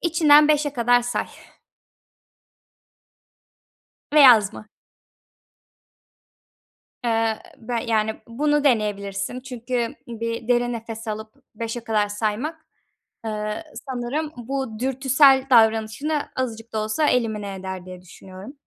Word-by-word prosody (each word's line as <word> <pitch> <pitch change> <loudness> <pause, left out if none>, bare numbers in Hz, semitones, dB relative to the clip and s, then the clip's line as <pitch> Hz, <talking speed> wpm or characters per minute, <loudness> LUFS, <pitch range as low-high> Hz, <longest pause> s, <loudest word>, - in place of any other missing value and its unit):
İçinden 305 -3 +5
5'e 295 -1 +2
kadar 245 -1 +3
say. 245 0 -2 2.8
Ve 300 - +6
yazma. 215 -5 +5 2.3
Eee, 225 -1 +1 0.2
be 235 +1 -3
yani, 220 -1 0
bunu 295 +4 0
deneyebilirsin. 210 -2 0
Çünkü 250 0 -3
bir 230 0 -5
derin 240 0 +2
nefes 225 0 -7
alıp 215 +1 -6 0.2
5'e 230 +2 -4
kadar 210 -2 +1
saymak, 225 +10 -3 0.6
eee, 215 +4 -4 0.2
sanırım 265 +5 -3
bu 245 -2 -4
dürtüsel 265 +1 +4
davranışını 225 +6 +3 0.2
azıcık 230 -3 -4
da 220 - -2
olsa 215 +8 0
elimine 215 -5 -1
eder 190 -1 -7
diye 180 -1 -10
düşünüyorum. 190 +5 -12
230 Hz, 100 wpm, -23 LUFS, 215-265 Hz, 2.8 s, Ve